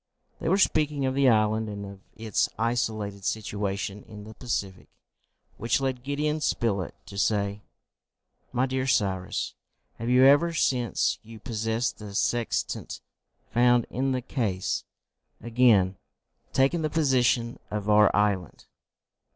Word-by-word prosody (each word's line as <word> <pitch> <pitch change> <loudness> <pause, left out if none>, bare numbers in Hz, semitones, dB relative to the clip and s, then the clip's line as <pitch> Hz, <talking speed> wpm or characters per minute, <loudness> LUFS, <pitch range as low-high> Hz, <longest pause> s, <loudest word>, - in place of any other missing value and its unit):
They - - -2
were 190 - +4
speaking 150 -7 +2
of 130 - 0
the 135 -1 +4
island 110 -1 +2
and 100 -1 -6
of 100 -1 -10 0.2
its 110 -1 0
isolated 110 -3 -1
situation 100 -1 -3
in 105 -2 -10
the 110 +1 -10
Pacific, 100 -6 -4 0.7
which 115 +4 +1
led 130 -2 -2
Gideon 150 +3 -1
Spilett 100 - -1
to 100 - -7
say, 100 -1 0 0.9
"My 125 +1 +1
dear 130 0 -2
Cyrus, 95 -6 0 0.5
have 115 +2 -3
you 125 +1 +6
ever, 145 +5 +5
since 125 -7 +1
you 115 0 -12
possessed 115 +2 -2
the 105 -2 -8
sextant 120 +2 -1 0.5
found 120 0 +4
in 135 +2 0
the 130 -1 -1
case, 105 -8 -2 0.5
again 115 -5 +3 0.5
taken 135 +6 +2
the 155 - 0
position 130 -6 +1
of 105 -1 -4
our 105 -1 +6
island?" 100 -3 0
115 Hz, 130 wpm, -27 LUFS, 105-130 Hz, 0.9 s, you